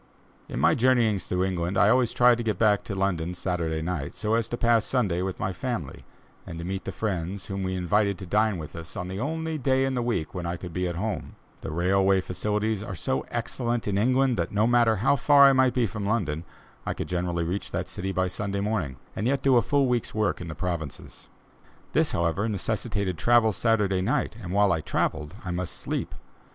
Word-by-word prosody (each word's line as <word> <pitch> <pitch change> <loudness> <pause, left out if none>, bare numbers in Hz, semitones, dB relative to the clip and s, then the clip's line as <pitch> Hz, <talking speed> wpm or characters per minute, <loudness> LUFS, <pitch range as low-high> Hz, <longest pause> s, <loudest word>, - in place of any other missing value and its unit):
In - - -4
my - - +4
journeyings 115 -5 +2
through 90 0 0
England, 90 0 -1
I 105 - +5
always 125 0 +3
tried 120 -1 +4
to - - -2
get 110 -4 -1
back 105 -1 +3
to 100 - -4
London 90 -3 -1
Saturday 85 -3 -2
night, 80 -5 -3
so 110 0 -1
as 115 -1 +1
to 120 - -3
pass 115 -2 +3
Sunday 100 -10 0
with 95 0 -3
my 95 - -1
family, 90 - -5 0.4
and 80 - -8
to 85 - -5
meet 95 +1 -4
the - - -3
friends 95 -2 -3
whom 95 0 -4
we 95 0 -2
invited 100 +2 +1
to 95 - -8
dine 105 +2 +2
with 80 -1 -8
us 85 -1 -7
on 90 - -4
the 95 +1 -4
only 160 +4 -2
day 135 0 +2
in 135 - -1
the 125 - 0
week 115 -10 -2
when 90 -2 -4
I 85 +1 -2
could 85 -1 -8
be 90 +1 -1
at 85 - -3
home. 105 +4 -4 0.3
The - - -5
railway 95 +4 +2
facilities 105 +3 -1
are 100 -3 -6
so 65 -4 -2
excellent 120 0 -2
in 100 -1 +1
England, 130 +2 +2
that, 85 -1 -1
no 105 +1 +2
matter 120 -1 +4
how 120 +8 +3
far 145 +1 +6
I 140 0 +8
might 130 -1 +3
be 125 -2 +3
from 100 0 -4
London, 85 -8 -1 0.4
I - - -3
could - - -4
generally 85 -1 -1
reach 90 +4 -3
that - - -3
city 95 +1 -4
by 95 -1 0
Sunday 100 +2 -3
morning, 100 -10 -1 0.2
and 105 - -1
yet 135 0 0
do 135 -2 +4
a 120 - +6
full 140 +2 +2
week's 120 -4 -1
work 105 -3 0
in 90 - -6
the 75 - -6
provinces. 80 -3 -5 0.6
This, - - +3
however, 85 +6 0
necessitated 100 -3 -2
travel 115 +2 +4
Saturday 105 -3 +1
night, 125 +3 0
and 90 -3 -6
while 100 +1 +3
I 80 -2 +1
travelled 75 +1 -2
I 90 - -3
must 90 0 -3
sleep. - - -3
100 Hz, 220 wpm, -26 LUFS, 90-115 Hz, 0.6 s, I